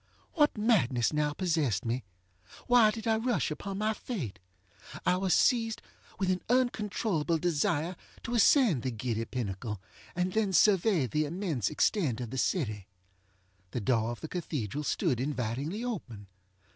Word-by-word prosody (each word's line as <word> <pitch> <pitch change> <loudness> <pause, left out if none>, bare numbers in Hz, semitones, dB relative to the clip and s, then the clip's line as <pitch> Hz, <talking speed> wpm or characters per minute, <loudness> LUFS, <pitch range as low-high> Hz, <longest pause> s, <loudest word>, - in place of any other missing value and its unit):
What 295 -7 +3
madness 160 - +2
now 150 0 +1
possessed 150 - 0
me? 120 +2 -1 0.6
Why 245 -3 +6
did 220 +1 -5
I 220 -1 +2
rush 235 -6 0
upon 195 +6 -5
my 215 +1 +1
fate? 150 - -5 0.7
I - - +4
was 190 0 0
seized 225 -1 +3 0.4
with 190 -1 +1
an 185 - -1
uncontrollable 210 -9 +1
desire 165 +1 0 0.3
to 240 - -4
ascend 230 - +5
the 130 - -2
giddy 115 -1 -2
pinnacle, 105 -3 -4 0.4
and 180 +1 -1
then 215 -3 +1
survey 190 - +4
the 150 +5 0
immense 155 - -2
extent 150 - +1
of 120 -2 -5
the 130 - -2
city. 110 - -1 0.8
The 120 - -3
door 115 0 +1
of 120 - -6
the 160 - -5
cathedral 150 - -3
stood 145 - 0
invitingly 140 - -2
open. 125 - -5
160 Hz, 145 wpm, -30 LUFS, -, 0.8 s, Why